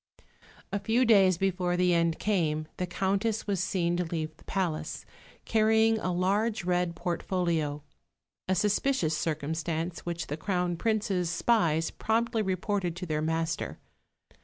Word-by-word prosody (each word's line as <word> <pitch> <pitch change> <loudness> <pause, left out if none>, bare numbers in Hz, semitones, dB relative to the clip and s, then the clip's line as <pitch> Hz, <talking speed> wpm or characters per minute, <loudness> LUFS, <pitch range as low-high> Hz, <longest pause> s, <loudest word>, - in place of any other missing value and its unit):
A 200 - -1
few 235 +5 +2
days 195 -6 +5
before 180 -1 0
the 180 0 +3
end 170 -1 +2
came 155 -7 0
the 180 - -2
Countess 200 +4 0
was 200 -3 -1
seen 175 -2 0
to 180 - +1
leave 160 -2 -4
the - - -20
palace, 180 -5 -2 0.4
carrying 220 0 +3
a 185 - -1
large 195 +4 +1
red 175 -1 0
portfolio 170 -4 -1 0.6
a 190 - +2
suspicious 210 - +1
circumstance 160 +2 -2
which 170 -1 -4
the 150 - -4
Crown 180 0 -1
Prince's 200 -3 0
spies 170 -4 +2
promptly 225 0 0
reported 190 -2 -1
to 180 +1 -5
their 155 -2 -1
master. 160 - -2
180 Hz, 135 wpm, -29 LUFS, 165-205 Hz, 0.6 s, days